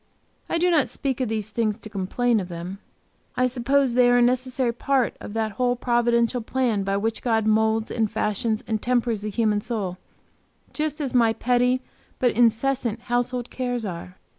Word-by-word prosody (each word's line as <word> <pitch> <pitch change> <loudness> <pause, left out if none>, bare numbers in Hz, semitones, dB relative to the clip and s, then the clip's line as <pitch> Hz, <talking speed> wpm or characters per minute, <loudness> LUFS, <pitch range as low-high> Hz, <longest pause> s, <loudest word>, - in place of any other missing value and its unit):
I - - +1
do 355 +1 +2
not 305 -5 +3
speak 265 -2 -3
of 250 - 0
these 220 -1 -2
things 215 -1 0
to 225 - -10
complain 215 +4 0
of 185 - -4
them. 175 +3 -6 0.6
I 255 - +3
suppose 255 +1 +1
they 245 0 +5
are 245 - +5
a - - +4
necessary 255 0 +1
part 260 +1 0
of 205 - -8
that 220 -1 -1
whole 245 +3 0
providential 240 0 +1
plan 235 -3 0
by 195 0 0
which 220 +2 -2
God 225 -3 +1
moulds 220 0 +2
and 220 -2 0
fashions 215 +2 -1
and 220 -2 -2
tempers 240 -3 0
the 215 - -3
human 210 -1 +1
soul, 200 -6 -3 0.7
just 305 0 -2
as 275 -3 -2
my 230 -3 +4
petty, 250 +2 +1 0.4
but 250 -2 +2
incessant 235 0 +1
household 245 0 -2
cares 245 -3 -2
are. 180 -1 -7
235 Hz, 180 wpm, -24 LUFS, 215-250 Hz, 0.7 s, they